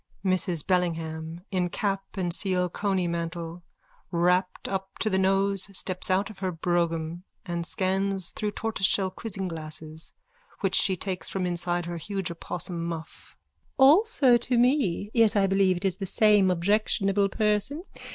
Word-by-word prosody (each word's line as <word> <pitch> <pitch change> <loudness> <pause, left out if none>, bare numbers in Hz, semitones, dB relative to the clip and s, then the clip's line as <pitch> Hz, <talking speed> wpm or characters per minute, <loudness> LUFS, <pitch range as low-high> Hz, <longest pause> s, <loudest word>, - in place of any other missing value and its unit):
MRS 180 -4 +1
BELLINGHAM: 165 -2 -1
_(In 180 -2 0
cap 195 -1 -1
and 175 -2 +1
seal 180 -1 +1
coney 190 -1 0
mantle, 170 0 -4 0.5
wrapped 180 +1 +1
up 195 0 -4
to 215 - -1
the 190 - +2
nose, 195 +1 +2
steps 185 0 -2
out 195 +3 +1
of 200 - -15
her 190 -1 -1
brougham 170 -1 -1 0.2
and 170 -2 -3
scans 190 0 0
through 210 - -2
tortoiseshell 195 -3 0
quizzing 195 -1 -5
glasses 155 -1 -7 0.5
which 195 -1 0
she 190 -1 +2
takes 185 0 -4
from 190 -2 -2
inside 175 0 -1
her 170 0 -4
huge 190 +1 -3
opossum 170 0 -4
muff.)_ 165 -2 -7 0.4
Also 280 - +6
to 240 +1 -1
me. 240 - +2
Yes, 225 -2 +4
I 200 -1 +4
believe 195 -1 +3
it 175 - -5
is 190 - +1
the 195 - -4
same 210 -1 +4
objectionable 195 +2 +2
person. 215 - 0
185 Hz, 150 wpm, -27 LUFS, 175-200 Hz, 0.5 s, Also